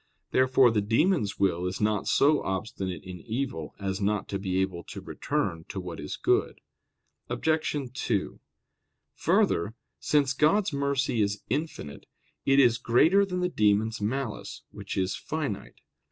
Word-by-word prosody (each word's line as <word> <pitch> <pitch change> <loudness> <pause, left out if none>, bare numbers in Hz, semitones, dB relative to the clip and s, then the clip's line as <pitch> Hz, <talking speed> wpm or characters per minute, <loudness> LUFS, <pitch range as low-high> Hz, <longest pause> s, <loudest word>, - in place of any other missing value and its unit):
Therefore 130 -1 +5
the 105 -2 +1
demons' 115 - +1
will 90 -2 +1
is 90 +1 -4
not 105 -1 0
so 145 +1 +4
obstinate 95 -1 -4
in 90 -1 -8
evil 110 - -4
as 95 0 -3
not 100 0 0
to 100 - -2
be 95 -2 -2
able 95 -2 -1
to - - -8
return 80 -1 -2
to 95 - -4
what 90 -2 -7
is 75 - -5
good. - - +1 0.7
Obj. 155 -1 0 0.2
2: 110 -6 -2 0.7
Further, 100 +7 +1 0.2
since 140 -2 +2
God's 160 +6 +2
mercy 140 -4 0
is 100 0 -1
infinite, 135 - -4 0.4
it 135 0 +5
is 120 -3 +5
greater 160 +12 +4
than 180 -1 -2
the 180 - +2
demons' 110 - +1
malice, 105 -3 -3
which 100 -1 -6
is 95 0 0
finite. 150 -10 -5
110 Hz, 145 wpm, -28 LUFS, 95-140 Hz, 0.7 s, Therefore